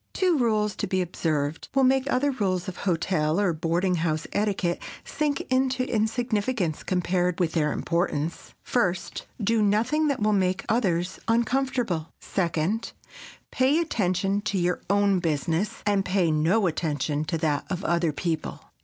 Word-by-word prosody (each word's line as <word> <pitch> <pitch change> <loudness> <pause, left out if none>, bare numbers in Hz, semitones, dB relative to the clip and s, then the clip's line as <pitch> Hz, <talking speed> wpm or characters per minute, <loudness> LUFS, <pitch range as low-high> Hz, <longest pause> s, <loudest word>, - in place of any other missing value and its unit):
Two 365 -3 +2
rules 215 -6 +1
to 205 - -2
be 185 0 0
observed 160 -4 -2
will 270 - +4
make 265 +1 +3
other 280 +3 +2
rules 190 -8 -1
of 185 - -5
hotel 165 -2 0
or 195 -4 +2
boarding 170 +3 0
house 160 -1 -1
etiquette 200 -4 0 0.2
sink 295 -1 -1
into 260 0 0
insignificance 220 -5 0
compared 180 -1 0
with 170 -3 +1
their 150 -3 +1
importance. 170 -2 -2
First: 185 -8 -1
Do 225 +1 +2
nothing 225 +10 +2
that 280 -3 0
will 215 0 +2
make 185 -1 +1
others 185 -6 0
uncomfortable. 230 -7 0
Second: 175 +4 -1 0.6
Pay 265 +3 +3
attention 200 - 0
to 205 -1 -1
your 180 0 0
own 200 -1 +3
business, 165 +3 -1
and 200 -2 +2
pay 180 -3 +1
no 165 +8 +2
attention 150 -3 -1
to 165 +2 -1
that 155 -2 -1
of 185 0 -3
other 170 -2 +2
people. 160 +1 -3
190 Hz, 145 wpm, -26 LUFS, 170-225 Hz, 0.6 s, will